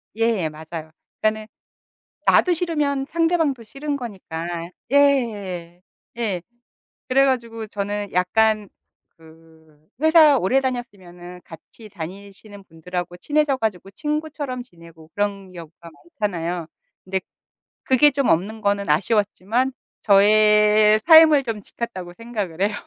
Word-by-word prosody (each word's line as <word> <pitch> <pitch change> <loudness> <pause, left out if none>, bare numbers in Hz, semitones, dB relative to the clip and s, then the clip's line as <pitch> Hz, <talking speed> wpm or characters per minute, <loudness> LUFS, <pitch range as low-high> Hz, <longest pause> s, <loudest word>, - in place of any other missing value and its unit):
예 225 -7 0
맞아요. 160 +1 -9 0.3
그러니까는 215 0 0 0.8
나도 360 - +4
싫으면 300 -5 -1
상대방도 325 -7 0
싫은 280 +6 -5
거니까 175 -8 -6 0.2
예 205 -12 +1 0.4
예. 205 -7 -2 0.7
그래 270 +2 +4
가지고 230 -4 -2
저는 205 0 -4
약간 215 +3 +1 0.5
그 160 -1 -21
회사 315 -3 +6
오래 250 +7 +2
다녔으면은 185 -9 -6
같이 185 +6 -14
다니시는 200 +3 -10
분들하고 175 +2 -6
친해져 295 +1 0
가지고 200 -5 -3
친구처럼 295 0 -4
지내고 165 -7 -17
그런 200 -2 -3
경우가 170 0 -12 0.3
많잖아요. 175 -4 -2 0.4
근데 190 0 -2 0.6
그게 265 +3 +4
좀 275 -1 0
없는 205 +7 0
거는 200 -2 0
아쉬웠지만 210 - +1 0.3
저의 210 +1 +5
삶을 315 -3 +7
좀 225 -4 -4
지켰다고 190 -5 -7
생각을 210 -8 -5
해요. 205 +1 +1
210 Hz, 275 characters per minute, -22 LUFS, 180-255 Hz, 0.8 s, 삶을